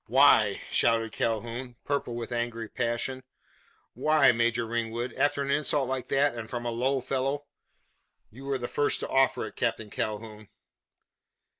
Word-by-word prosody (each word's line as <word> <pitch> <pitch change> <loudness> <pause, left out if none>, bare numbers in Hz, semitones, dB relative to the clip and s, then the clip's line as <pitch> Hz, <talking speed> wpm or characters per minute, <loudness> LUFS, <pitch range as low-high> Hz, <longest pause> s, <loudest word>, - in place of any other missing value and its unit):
"Why?" - - +5
shouted 115 -1 +2
Calhoun, 120 +3 -3
purple 140 -4 -1
with 120 0 -5
angry 120 -1 -2
passion. 120 +3 -2 0.7
"Why, 155 -4 +4
Major 120 0 +1
Ringwood? 115 +1 -3
After 145 -1 +1
an 140 - -2
insult 145 -2 +2
like 130 -1 -3
that, 140 0 +2
and 115 -2 -7
from 120 -1 -4
a 120 - -1
low 130 +3 0
fellow 135 +3 -2 0.4
" - - -41
"You 130 +5 -11
were 140 -1 0
the 120 -1 -4
first 145 - 0
to - - -3
offer 135 -3 +2
it, 110 - -9
Captain 105 -2 -2
Calhoun." 110 -1 -4
120 Hz, 155 wpm, -28 LUFS, 115-135 Hz, 0.7 s, Why